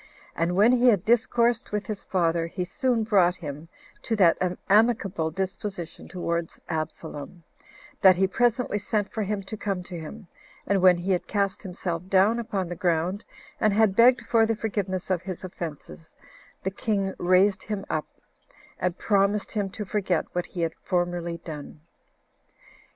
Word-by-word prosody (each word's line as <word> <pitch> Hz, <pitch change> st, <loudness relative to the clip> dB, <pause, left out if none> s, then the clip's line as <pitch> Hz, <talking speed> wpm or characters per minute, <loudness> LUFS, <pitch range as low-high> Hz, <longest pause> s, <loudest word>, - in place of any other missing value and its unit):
And 170 Hz, +2 st, 0 dB
when 210 Hz, +5 st, +6 dB
he 250 Hz, 0 st, +4 dB
had 205 Hz, -7 st, +4 dB
discoursed 235 Hz, +1 st, +2 dB
with 210 Hz, 0 st, -2 dB
his 210 Hz, -2 st, -5 dB
father, 170 Hz, -2 st, 0 dB
he 180 Hz, +2 st, -4 dB
soon 245 Hz, +3 st, 0 dB
brought 190 Hz, -5 st, +3 dB
him 150 Hz, -1 st, -7 dB, 0.3 s
to 225 Hz, -, -1 dB
that 180 Hz, -6 st, +5 dB, 0.3 s
amicable 200 Hz, -6 st, +3 dB
disposition 190 Hz, 0 st, -5 dB
towards 170 Hz, -2 st, -3 dB
Absalom, 160 Hz, +1 st, -5 dB, 0.6 s
that 190 Hz, -1 st, +8 dB
he 190 Hz, +2 st, +3 dB
presently 235 Hz, +2 st, +1 dB
sent 205 Hz, 0 st, -2 dB
for 220 Hz, -, -2 dB
him 205 Hz, -1 st, -2 dB
to 205 Hz, +3 st, -7 dB
come 195 Hz, -3 st, -3 dB
to 175 Hz, -1 st, -7 dB
him; 195 Hz, +7 st, -9 dB, 0.4 s
and 195 Hz, -1 st, +1 dB
when 180 Hz, -1 st, +6 dB
he 180 Hz, +3 st, -2 dB
had 180 Hz, -, 0 dB
cast 200 Hz, -2 st, -1 dB
himself 180 Hz, -2 st, -4 dB
down 200 Hz, +5 st, +4 dB
upon 200 Hz, -5 st, -2 dB
the 175 Hz, -, -5 dB
ground, 175 Hz, +4 st, 0 dB, 0.4 s
and 215 Hz, -2 st, +3 dB
had 210 Hz, -2 st, +3 dB
begged 240 Hz, +2 st, +6 dB
for 230 Hz, -1 st, +3 dB
the 225 Hz, -, +1 dB
forgiveness 195 Hz, -4 st, -3 dB
of 180 Hz, -2 st, +1 dB
his 185 Hz, -1 st, -7 dB
offenses, 150 Hz, -, -8 dB, 0.5 s
the 190 Hz, -, -1 dB
king 195 Hz, -2 st, -1 dB
raised 190 Hz, +2 st, +3 dB
him 210 Hz, -2 st, -4 dB
up, 155 Hz, -, -2 dB, 0.7 s
and 180 Hz, 0 st, -1 dB
promised 200 Hz, 0 st, +1 dB
him 205 Hz, -3 st, -1 dB
to 210 Hz, +2 st, -6 dB
forget 190 Hz, -4 st, 0 dB
what 175 Hz, 0 st, -2 dB
he 175 Hz, -, -5 dB
had 165 Hz, -1 st, 0 dB
formerly 175 Hz, -1 st, -1 dB
done. 150 Hz, -2 st, -8 dB
190 Hz, 160 wpm, -26 LUFS, 175-210 Hz, 0.7 s, that